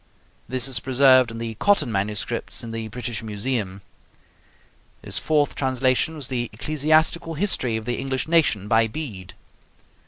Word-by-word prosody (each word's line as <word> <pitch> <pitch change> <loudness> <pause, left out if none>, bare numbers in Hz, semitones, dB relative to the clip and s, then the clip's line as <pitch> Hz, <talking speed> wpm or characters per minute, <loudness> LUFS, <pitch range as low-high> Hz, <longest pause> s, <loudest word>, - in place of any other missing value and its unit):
This 130 0 -1
is 130 -3 +2
preserved 130 -1 +5
in 115 - -7
the 115 0 -4
Cotton 200 -11 +2
MSS. 100 +3 -2
in 115 - -6
the 115 -1 -4
British 120 0 -5
Museum. 105 -3 -3 1.2
His - - -2
fourth 150 -2 +1
translation 130 +3 +1
was 145 -5 -3
the 120 -3 -2
'Ecclesiastical 155 +6 +1
History 145 - +1
of 110 - -7
the 120 0 -2
English 130 +1 -2
Nation,' 155 - +2
by 115 +1 +3
Bede. 105 - -7
125 Hz, 145 wpm, -23 LUFS, 110-145 Hz, 1.2 s, preserved